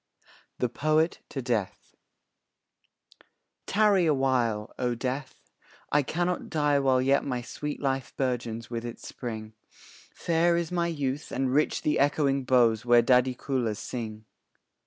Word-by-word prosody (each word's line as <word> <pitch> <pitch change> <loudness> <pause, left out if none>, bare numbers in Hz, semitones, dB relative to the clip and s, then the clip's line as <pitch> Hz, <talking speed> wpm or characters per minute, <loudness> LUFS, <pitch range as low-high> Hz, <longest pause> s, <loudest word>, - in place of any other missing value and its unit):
THE 125 - +1
POET 155 +6 +1
TO 135 - -5
DEATH 110 -7 -3 1.7
Tarry 200 -4 +3
a 150 - +3
while, 120 -6 0
O 125 -1 0
Death, 130 +2 -5 0.4
I 145 - +4
cannot 175 +5 -2
die 150 -3 +2
While 130 -2 +2
yet 135 +1 +3
my 125 -3 -3
sweet 150 +4 -5
life 135 -1 -2
burgeons 120 -3 -2
with 115 -1 -3
its 120 0 -7
spring; 110 -3 -6 0.6
Fair 170 +1 +1
is 170 -1 -2
my 170 -1 0
youth, 145 -4 -3
and 130 0 -1
rich 150 +2 +1
the 150 - +1
echoing 140 -1 +2
boughs 120 -3 +3
Where 120 -1 +5
dhadikulas 125 -2 +1
sing. 110 -3 -6
130 Hz, 135 wpm, -27 LUFS, 120-150 Hz, 1.7 s, Where